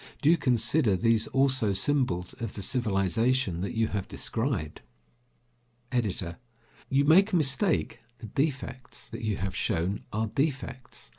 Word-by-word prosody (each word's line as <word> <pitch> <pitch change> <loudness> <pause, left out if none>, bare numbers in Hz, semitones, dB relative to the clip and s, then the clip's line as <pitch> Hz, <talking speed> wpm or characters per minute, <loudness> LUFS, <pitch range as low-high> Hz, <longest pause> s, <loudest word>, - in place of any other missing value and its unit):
Do 150 - +6
you 170 - +5
consider 120 - +2
these 115 +2 +2
also 130 -6 +2
symbols 95 -5 +1
of 115 -3 -4
the 100 - -4
civilization 110 -2 +1
that 100 - -3
you 110 -1 +2
have 100 -2 -3
described? 110 - -3 1.1
EDITOR: 95 -8 -2 0.5
You 140 +1 +3
make 190 +7 +5
a - - +5
mistake. 140 - +1 0.2
The 115 - -9
defects 130 +1 -3
that - - -7
you 110 -3 -1
have 95 0 -3
shown 95 0 -1
are 110 +1 0
defects. 130 0 -3
115 Hz, 140 wpm, -28 LUFS, 100-135 Hz, 1.1 s, Do